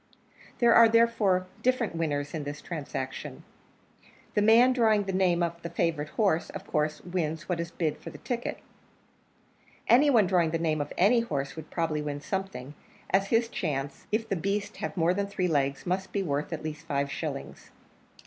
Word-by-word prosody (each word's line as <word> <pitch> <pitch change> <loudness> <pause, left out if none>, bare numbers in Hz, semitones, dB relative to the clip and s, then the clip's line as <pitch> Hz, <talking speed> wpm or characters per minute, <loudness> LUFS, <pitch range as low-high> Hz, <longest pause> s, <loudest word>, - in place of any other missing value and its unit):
There 235 -1 +5
are, 230 -1 +8
therefore, 220 -5 +3 0.2
different 250 -7 +1
winners 145 -3 -2
in 155 -3 -3
this 145 0 -6
transaction; 145 -5 -6 0.9
the 210 - +2
man 230 +4 +6
drawing 220 -4 +3
the 195 -1 -4
name 180 -2 +2
of 170 0 -3
the 170 - -5
favourite 165 -3 -1
horse 195 -7 +1
of 195 0 -8
course 150 -3 -1
wins 165 -3 -3
what 180 -2 -1
is 170 -1 -3
bid 165 -3 -2
for - - -8
the - - -10
ticket; 245 -2 -3 1.3
any 275 +5 +6
one 230 -7 +5
drawing 175 -3 +2
the 165 - 0
name 155 -2 0
of 145 - -5
any 215 +7 +5
horse 140 -12 -3
would 160 -1 -9
probably 160 -3 -1
win 145 -1 -4
something, 150 -4 -4 0.4
as 195 +1 +3
his 230 +2 +2
chance, 145 - -4
if 220 +1 0
the 200 - -1
beast 200 +4 -2
have - - -5
more 170 +1 +3
than 200 +1 -1
three 190 -2 -1
legs, 140 -4 0
must 190 +1 -2
be 200 - -1
worth 145 -3 -2
at - - -4
least 155 +1 -6
five 140 -2 -1
shillings. - - -6
175 Hz, 185 wpm, -28 LUFS, 155-205 Hz, 1.3 s, are